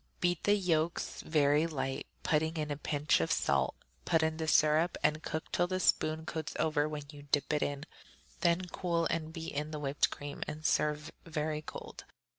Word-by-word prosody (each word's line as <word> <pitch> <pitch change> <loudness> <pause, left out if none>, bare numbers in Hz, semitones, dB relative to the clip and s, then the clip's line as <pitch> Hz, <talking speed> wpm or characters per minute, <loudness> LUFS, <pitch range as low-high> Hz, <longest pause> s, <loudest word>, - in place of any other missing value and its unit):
Beat 175 -2 +1
the 205 - +5
yolks 170 -4 0
very 150 0 +3
light, 135 -4 -3 0.2
putting 160 +1 +1
in 150 -1 -2
a - - 0
pinch 150 - +1
of 80 - 0
salt; 70 -1 +2 0.3
put 160 -1 +2
in 160 0 0
the 160 -1 -2
syrup 155 +3 +4
and 155 +1 +2
cook 160 +1 -4
till 175 - +2
the 185 0 -1
spoon 160 -3 +2
coats 160 -1 -4
over 155 -1 +1
when 150 -1 -4
you 145 -1 -11
dip 145 0 +2
it 150 - +1
in; 145 0 -1 0.6
then 170 0 +3
cool 170 -2 0
and 160 -1 -2
beat 165 0 -6
in 150 +2 -2
the 155 - -4
whipped 140 0 +1
cream, 145 0 -7
and 155 0 -6
serve 150 0 +1
very 155 -2 -2
cold. - - -9
155 Hz, 190 wpm, -32 LUFS, 150-165 Hz, 0.6 s, the